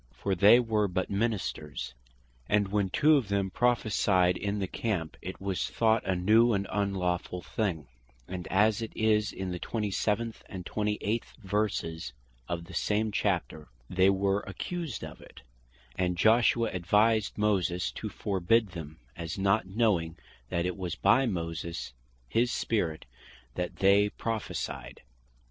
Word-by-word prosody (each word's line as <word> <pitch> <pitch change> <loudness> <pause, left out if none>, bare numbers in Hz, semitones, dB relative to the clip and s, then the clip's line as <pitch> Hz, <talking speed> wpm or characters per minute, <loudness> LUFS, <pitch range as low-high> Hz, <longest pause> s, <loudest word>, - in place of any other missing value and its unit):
For 95 +11 -2
they 105 +6 +7
were 110 -3 +1
but 95 +1 -2
Ministers; 100 - -2 0.6
and 105 -2 +2
when 100 -1 +1
two 150 +8 +5
of 125 -7 -1
them 100 -1 0
Prophecyed 105 -7 +2
in 100 +1 -2
the 100 - -1
Camp, 95 -5 -3
it 95 +2 -7
was 95 -1 -2
thought 110 -1 +2
a 95 - +2
new 110 +6 +4
and 100 -1 0
unlawfull 90 -3 -1
thing; 90 -9 -2 0.4
and 90 -1 -6
as 105 +3 +3
it 115 - -4
is 105 -1 +2
in 95 -1 -4
the 90 - -4
27. 110 +2 -1
and 95 -4 -7
28. 105 +1 -1 0.2
verses 95 - -2 0.4
of 85 -1 -3
the 95 - -12
same 105 +1 0
Chapter, 90 -7 -1 0.2
they 95 +1 +4
were 100 +1 +2
accused 165 - -4
of - - -9
it, - - -15 0.5
and 90 -1 0
Joshua 115 +2 +4
advised 105 +4 +2
Moses 90 - +1
to - - -5
forbid 100 +3 +1
them, 80 -4 -8 0.2
as 85 +1 -5
not 100 +1 +2
knowing 95 -6 +1 0.3
that 85 0 0
it 90 +1 -2
was 90 -3 -3
by 135 0 +4
Moses 85 - -4 0.3
his 120 - +1
Spirit 85 -9 -1 0.5
that 90 +5 -3
they 100 +1 +4
Prophecyed. 115 0 -4
100 Hz, 145 wpm, -29 LUFS, 90-110 Hz, 0.6 s, they